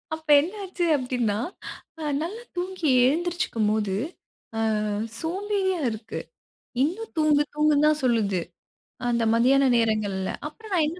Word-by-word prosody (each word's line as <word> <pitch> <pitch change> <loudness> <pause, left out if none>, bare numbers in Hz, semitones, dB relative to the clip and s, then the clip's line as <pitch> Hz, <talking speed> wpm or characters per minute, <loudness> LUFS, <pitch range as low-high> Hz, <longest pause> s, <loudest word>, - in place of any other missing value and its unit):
அப்ப 315 -1 -15
என்ன 335 +8 -2
ஆச்சு 370 -2 -3
அப்பிடின்னா, 250 -6 -1 0.6
ஆ - - -7 0.2
நல்லா 400 +8 -4
தூங்கி 360 -2 -2 0.2
எழுந்திருச்சிக்கும்போது, 250 - 0 0.9
அ - - -1 0.3
சோம்பேறியா 380 +2 -1
இருக்கு. 220 0 -6 0.6
"இன்னும் 385 +10 -3
தூங்கு, 300 -1 +4
தூங்குன்தான் 300 0 +3
சொல்லுது. 210 -7 +2 0.7
அந்த 235 -1 +1
மதியான 265 +4 +4
நேரங்கள்ல. 210 -4 0 0.2
அப்புறம் 420 +7 -9
நான் 315 -4 +3
என்ன 340 +4 -5
300 Hz, 115 wpm, -25 LUFS, 230-355 Hz, 0.9 s, தூங்கு